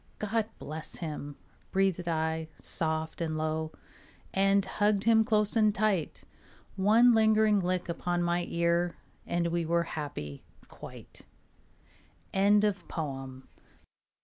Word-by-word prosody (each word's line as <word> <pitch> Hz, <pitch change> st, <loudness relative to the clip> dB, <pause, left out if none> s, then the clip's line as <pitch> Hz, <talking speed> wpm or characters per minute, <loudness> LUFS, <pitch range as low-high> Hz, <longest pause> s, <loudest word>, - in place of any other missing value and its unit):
"God 215 Hz, +1 st, -1 dB
bless 155 Hz, +2 st, -6 dB
him," 150 Hz, -3 st, -6 dB, 0.4 s
breathed 190 Hz, -2 st, +1 dB
I 160 Hz, -1 st, -1 dB
soft 160 Hz, 0 st, -3 dB
and 160 Hz, -1 st, -1 dB
low, 155 Hz, 0 st, -2 dB, 0.6 s
And 195 Hz, 0 st, +3 dB
hugged 205 Hz, +1 st, +1 dB
him 225 Hz, 0 st, +5 dB
close 215 Hz, -2 st, +1 dB
and 215 Hz, -2 st, +3 dB
tight. 195 Hz, -6 st, 0 dB, 0.5 s
One 220 Hz, +5 st, +5 dB
lingering 220 Hz, -1 st, +4 dB
lick 180 Hz, -1 st, -1 dB
upon 175 Hz, +1 st, -1 dB
my 175 Hz, 0 st, 0 dB
ear 170 Hz, 0 st, +1 dB, 0.3 s
And 175 Hz, 0 st, 0 dB
we 170 Hz, 0 st, 0 dB
were 170 Hz, +1 st, +1 dB
happy 140 Hz, -, -6 dB, 0.3 s
quite. -, -, -12 dB, 1.1 s
ANONYMOUS. 170 Hz, -10 st, 0 dB
175 Hz, 110 wpm, -30 LUFS, 160-205 Hz, 1.1 s, him